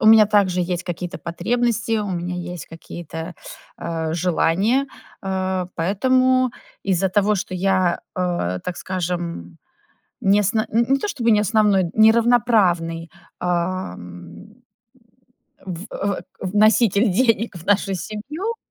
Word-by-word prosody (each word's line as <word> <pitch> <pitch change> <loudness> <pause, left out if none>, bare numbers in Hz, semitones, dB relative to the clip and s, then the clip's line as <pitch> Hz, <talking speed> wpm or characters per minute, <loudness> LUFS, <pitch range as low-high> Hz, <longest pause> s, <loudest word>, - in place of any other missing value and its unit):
у - - +2
меня 220 -1 +8
также 200 -3 +2
есть 175 0 -2
какие-то 175 +1 -5
потребности, 230 +5 -1
у 205 -2 -3
меня 180 0 -3 0.2
есть 175 - -8
какие-то, 165 +1 -8 0.4
а, 165 -1 -3
желания, 185 - +1 0.4
а, 190 -1 -1
поэтому 255 +8 +2 0.3
из-за 190 0 +1
того, 205 +2 +2
что 185 0 -4
я, 185 -1 +1 0.2
э, 175 - -1
так 180 -1 -4
скажем, 170 - -4 0.7
не 200 +2 +4
сн 210 +3 +1
не 235 +5 +3
то 420 - -2
чтобы 240 - -1
не 210 - +5
основной, 210 -2 +3
не 220 0 +7
равноправный, 205 -8 +2 0.3
ам 90 - -4 1.1
в 180 -2 -6
э, 200 -1 -2
э, - - -11 0.2
вноситель 210 +2 +3
денег 230 0 +1
в 165 - -12
нашу 200 -1 +2
семью. 280 - -5
190 Hz, 125 wpm, -21 LUFS, 175-220 Hz, 1.1 s, меня